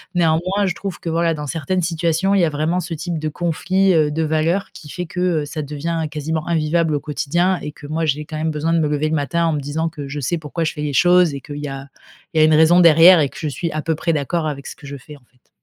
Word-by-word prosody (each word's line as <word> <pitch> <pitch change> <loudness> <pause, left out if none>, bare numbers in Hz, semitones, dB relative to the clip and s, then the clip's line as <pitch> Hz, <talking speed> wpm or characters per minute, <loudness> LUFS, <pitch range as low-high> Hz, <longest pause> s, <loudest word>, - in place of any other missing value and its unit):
Néanmoins, 175 +4 +1
je 185 - 0
trouve 195 0 -6
que, 170 - -5
voilà, 165 0 +1
dans 150 -1 -6
certaines 170 +4 -2
situations, 170 +3 0
il 200 - +3
y - - +4
a 160 - 0
vraiment 155 +4 -1
ce 175 -1 -5
type 165 +1 -4
de 155 0 -2
conflit, 185 +4 +1
heu, 155 -3 +3
de 160 +2 -1
valeurs, 160 +5 0
qui 150 - -12
fait 180 +4 -5
que, 180 - -7 0.2
heu, - - -4
ça 155 +1 -5
devient 155 +3 -3
quasiment 155 +1 -3
invivable 160 -1 +1
au 145 - 0
quotidien 170 +5 0
et 150 - -5
que 150 - -14
moi, 155 +3 -2
j'ai 150 0 -1
quand 155 - -8
même 160 +1 -1
besoin 155 +2 -1
de 165 - +3
me 155 - +1
lever 150 +1 0
le 160 - 0
matin 170 +3 0
en 165 - +1
me 150 - -1
disant 150 +4 -2
que 145 -3 -8
je 145 +2 -5
sais 155 +6 -1
pourquoi 160 +2 -4
je 160 - -1
fais 150 - -6
les 150 -1 -2
choses - - +4 0.3
et 140 - -6
qu'il 145 +2 -8
y 145 0 -5
a 135 0 -7 0.5
il 160 - -2
y - - +6
a - - +7
une 155 - +4
raison 160 +3 +5
derrière 170 +1 +8
et 145 - +2
que 140 - -14
je 155 - -3
suis 170 +4 -3
à 155 - -3
peu 160 +2 -1
près 165 +2 -1
d'accord 155 +2 -1
avec 140 -2 -5
ce - - -8
que 150 -5 -13
je 140 - -7
fais, 145 +2 -13
en - - -25
fait. 125 0 -36
160 Hz, 295 wpm, -20 LUFS, 150-170 Hz, 0.5 s, derrière